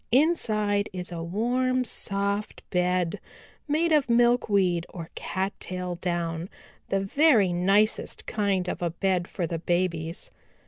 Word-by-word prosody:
Inside 215 -8 +2
is 180 -1 -3
a 170 -1 -4
warm, 250 +8 0
soft 200 -1 -1
bed 180 -1 +1 0.5
made 320 +3 +1
of 295 -5 +3
milkweed 205 -8 +3
or 165 -3 -8
cattail 185 -1 -3
down, 170 -1 -2 0.4
the 195 - +1
very 210 - +4
nicest 195 +5 +1
kind 200 -4 0
of - - -3
a 175 - +1
bed 180 +1 0
for 180 - -3
the 165 0 -3
babies. 170 -1 -1
195 Hz, 125 wpm, -26 LUFS, 175-220 Hz, 0.5 s, very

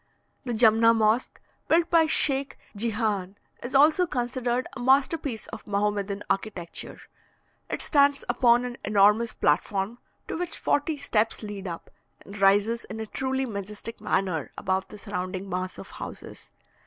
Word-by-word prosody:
The 245 - -2
Jumna 230 0 +5
Mosque, 220 +2 +1 0.3
built 335 +1 +3
by 330 -1 +6
the - - -4
Sheikh 275 -3 +1 0.2
Djihan, 210 -3 -1 0.3
is 245 +3 -5
also 310 +6 +5
considered 245 -1 -1
a - - -7
masterpiece 265 -1 +1
of 220 - -9
Mahomedan 205 0 -1
architecture; 195 -4 -4 0.7
it - - -2
stands 285 -2 +3
upon 245 0 +3
an 245 -1 -6
enormous 210 +2 +3
platform, 200 +4 0 0.3
to - - -4
which 350 0 -3
forty 295 +1 0
steps 225 -5 0
lead 205 -2 -6
up, 170 -1 -7 0.3
and 200 +1 -11
rises 205 +4 +3
in 220 +2 -7
a 220 - -3
truly 265 +4 -2
majestic 210 +1 -7
manner 185 -5 -1
above 190 0 -1
the 210 - -11
surrounding 190 -2 -5
mass 185 0 -4
of - - -10
houses. - - -9
225 Hz, 145 wpm, -26 LUFS, 200-260 Hz, 0.7 s, by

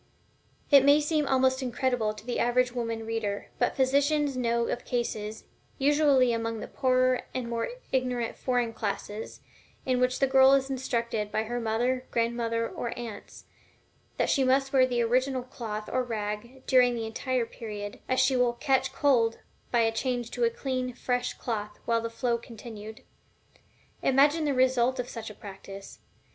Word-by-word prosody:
It 280 -2 +8
may 285 +2 +6
seem 300 -1 0
almost 260 0 +2
incredible 245 -3 0
to 215 0 -11
the 245 - -2
average 245 +1 +2
woman 230 -2 -3
reader, 220 -3 -3
but 245 - +1
physicians 280 +2 +2
know 235 -1 +1
of 245 - -3
cases 220 -3 -3 0.3
(usually 280 -3 +4
among 230 -1 -2
the - - -6
poorer 255 -1 +2
and 255 -2 -2
more 235 -1 -2 0.2
ignorant 250 -3 -1
foreign 245 -3 -1
classes) 210 0 -5 0.4
in 255 -1 +1
which 250 0 +2
the 275 - +3
girl 265 0 +6
is 270 0 +2
instructed 235 -5 -2
by 220 - 0
her 240 +2 -3
mother, 240 +3 0
grandmother, 230 0 0
or 235 - -5
aunts, 235 -3 -8 0.7
that - - +1
she 275 - +3
must 270 +1 +2
wear 260 -1 +5
the 240 -2 +1
original 255 +2 +1
cloth 215 -4 -6
or 255 0 0
rag 225 +2 -5
during 250 -2 +4
the 225 -1 -3
entire 245 +2 -1
period, 210 -3 -7
as 255 - +2
she 260 +1 +3
will 250 -1 +3
"catch 265 +1 +1
cold" 240 -6 +2 0.3
by 240 - +3
a 225 0 +3
change 245 0 -2
to - - -2
a 465 - +5
clean, 255 - -3
fresh 245 -1 -1
cloth 210 -3 -4
while 230 -1 +1
the 230 - -3
flow 235 0 -1
continued. 220 -2 -10 1.0
Imagine 290 +4 +4
the 290 - +1
result 255 0 +2
of 250 - -2
such 225 -2 -6
a 210 - -11
practice! 195 -1 -10
245 Hz, 165 wpm, -28 LUFS, 230-260 Hz, 1.0 s, It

